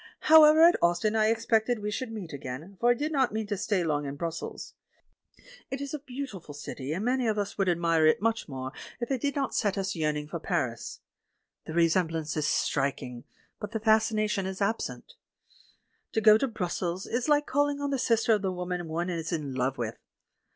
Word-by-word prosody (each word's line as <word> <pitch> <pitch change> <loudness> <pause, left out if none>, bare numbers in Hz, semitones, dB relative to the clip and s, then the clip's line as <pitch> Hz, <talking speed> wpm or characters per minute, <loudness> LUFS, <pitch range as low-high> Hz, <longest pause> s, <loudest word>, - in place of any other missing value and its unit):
However, 310 0 +8
at 340 +1 +6
Ostend 175 +5 +2
I 215 -1 +3
expected 225 +1 +1
we 210 0 -4
should 240 +2 -4
meet 195 -8 -7
again, 140 +8 -7
for 240 - +3
I 245 - +5
did 295 +5 -2
not 265 -5 +2
mean 220 +1 -2
to 205 0 -2
stay 200 -1 0
long 145 -3 -1
in 140 - -5
Brussels. 165 +2 -5 1.0
It 265 - -4
is 280 0 -5
a 300 - -3
beautiful 250 - -7
city, 145 -1 -6
and 185 +7 -2
many 250 -1 +1
of 215 -1 0
us 205 -1 -2
would 195 -2 +2
admire 165 -2 +3
it 155 - +4
much 225 -3 -1
more 130 -1 -5 0.3
if 240 +2 -4
it 260 -3 0
did 285 0 -1
not 275 -2 -1
set 205 -3 0
us 195 0 -2
yearning 150 -2 -1
for 165 +2 -5
Paris. 145 -10 -3 0.7
The 160 - -5
resemblance 165 -2 +1
is 150 -2 0
strik 140 -1 0
ing, 125 -1 -9 0.3
but 210 +1 -6
the 225 - -1
fascination 215 -2 +2
is 190 0 -5
absent. 225 - -2 1.0
To - - +2
go 215 0 +8
to 270 +5 +1
Brus 210 -7 -3
sels 180 +1 -3
is 245 +5 -2
like 295 0 +4
calling 285 +1 +1
on 285 0 -2
the 275 - 0
sister 230 -1 +3
of 210 - +1
the 190 -2 -1
woman 180 -1 -4
one 170 +3 -2
is 165 -1 -4
in 150 -5 -3
love 130 +1 -1
with. 115 -2 -4
200 Hz, 205 wpm, -28 LUFS, 160-235 Hz, 1.0 s, However